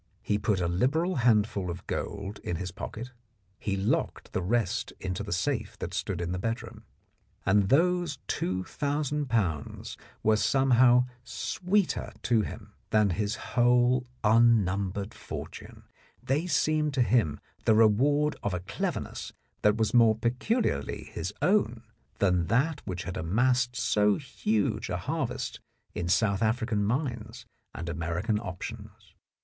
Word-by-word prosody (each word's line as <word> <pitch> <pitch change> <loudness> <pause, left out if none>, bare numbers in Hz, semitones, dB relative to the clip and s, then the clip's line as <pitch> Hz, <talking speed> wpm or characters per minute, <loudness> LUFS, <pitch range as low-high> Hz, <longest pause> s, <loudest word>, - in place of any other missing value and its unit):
He 105 - 0
put 105 -2 +1
a 85 - +1
liberal 145 - +1
handful 105 -6 +2
of 85 +1 -6
gold 100 0 -4
in 85 - -3
his 90 +1 -4
pocket; 120 +7 -7 0.5
he 100 -1 -2
locked 95 +2 -1
the - - 0
rest 110 +1 0
into 95 +1 -3
the 105 - -6
safe 110 +3 -1
that - - -5
stood 90 -3 -2
in 85 0 -2
the 90 - -2
bedroom. 115 +4 -4 0.6
And 100 -1 +3
those 175 +1 +2
two 95 +1 -1
thousand 145 +3 -2
pounds 90 - -2 0.3
were 110 0 +4
somehow 125 0 +4 0.2
sweeter 185 +9 -1
to 110 0 +3
him 105 0 -7 0.2
than 105 -3 +3
his 105 +4 -1
whole 125 +1 +2 0.2
un 115 -1 +5
numbered 100 +2 -3
fortune: - - -8 0.4
they 150 +7 0
seemed 155 -2 +1
to 130 - +4
him 105 -9 +2 0.3
the 110 - +5
reward 140 +8 +4
of 100 -3 -1
a - - -2
cleverness 95 - -4 0.3
that 105 +1 +3
was 110 -2 0
more 115 -2 +6
peculiarly 120 - -1
his - - -3
own - - +2 0.3
than 90 -4 +2
that 150 +6 +1
which 90 -2 -3
had 95 - -5
amassed 125 +7 +1
so 105 -4 +3
huge 110 -6 -1
a - - -1
harvest - - -3 0.3
in 85 0 -3
South 100 +1 +2
African 110 -1 +1
mines 120 -1 -2 0.3
and 85 - -5
American 85 +7 -1
options. 105 +1 -8
110 Hz, 140 wpm, -28 LUFS, 95-125 Hz, 0.6 s, more